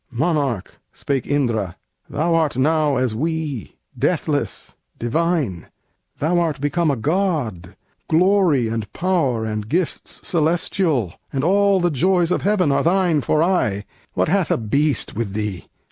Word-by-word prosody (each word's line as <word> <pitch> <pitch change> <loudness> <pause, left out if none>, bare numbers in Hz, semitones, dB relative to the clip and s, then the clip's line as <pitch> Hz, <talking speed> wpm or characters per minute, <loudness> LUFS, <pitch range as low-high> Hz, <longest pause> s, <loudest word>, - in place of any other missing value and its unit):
"Monarch," 135 - -1
spake 135 -4 -3
Indra, 115 -10 0 0.3
"thou 165 +3 0
art 160 -6 +1
now 150 +1 +2
as 125 -3 0
we, 155 - -3 0.2
Deathless, - - -1 0.2
divine; 135 - -1 0.5
thou 170 +4 +1
art 160 -5 -1
become 155 +3 +1
a 140 - +2
god; 130 - -1 0.3
Glory 170 - +3
and 110 -2 -4
power 155 -11 0
and 105 -1 -4
gifts 175 +2 -2
celestial, 160 - +1 0.2
And 135 -1 -2
all 200 +2 +3
the 175 -1 +1
joys 175 +4 +2
of - - +1
heaven 190 -7 +2
are 140 - +2
thine 175 -3 +2
for 155 +5 +2
aye; 105 - +1 0.3
What - - +2
hath 190 +1 +1
a - - +2
beast 140 +5 0
with 105 -3 -3
these? 105 -4 -4
150 Hz, 140 wpm, -21 LUFS, 115-175 Hz, 0.5 s, Glory